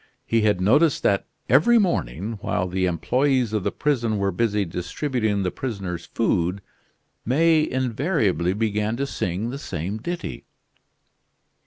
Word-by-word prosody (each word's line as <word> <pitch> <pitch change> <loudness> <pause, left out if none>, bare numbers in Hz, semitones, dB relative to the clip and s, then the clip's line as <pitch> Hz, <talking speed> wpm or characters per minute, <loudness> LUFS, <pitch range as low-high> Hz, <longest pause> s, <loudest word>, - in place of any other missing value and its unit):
He 115 -1 +2
had 105 -3 +2
noticed 140 - +3
that 100 -1 +2 0.2
every 155 - +5
morning, 110 - -1
while 90 - -1
the 95 +1 0
employees 125 +6 +1
of 105 - +1
the - - 0
prison 120 -7 0
were 100 -1 0
busy 105 +1 0
distributing 105 - -2
the 90 - -1
prisoner's 95 -6 -5
food, 95 -3 0 0.6
May 155 +5 +3
invariably 120 - 0
began 105 +1 -1
to 140 - -1
sing 105 -2 -3
the 140 - -5
same 100 - -4
ditty. 175 +9 -5
110 Hz, 135 wpm, -23 LUFS, 95-130 Hz, 0.6 s, every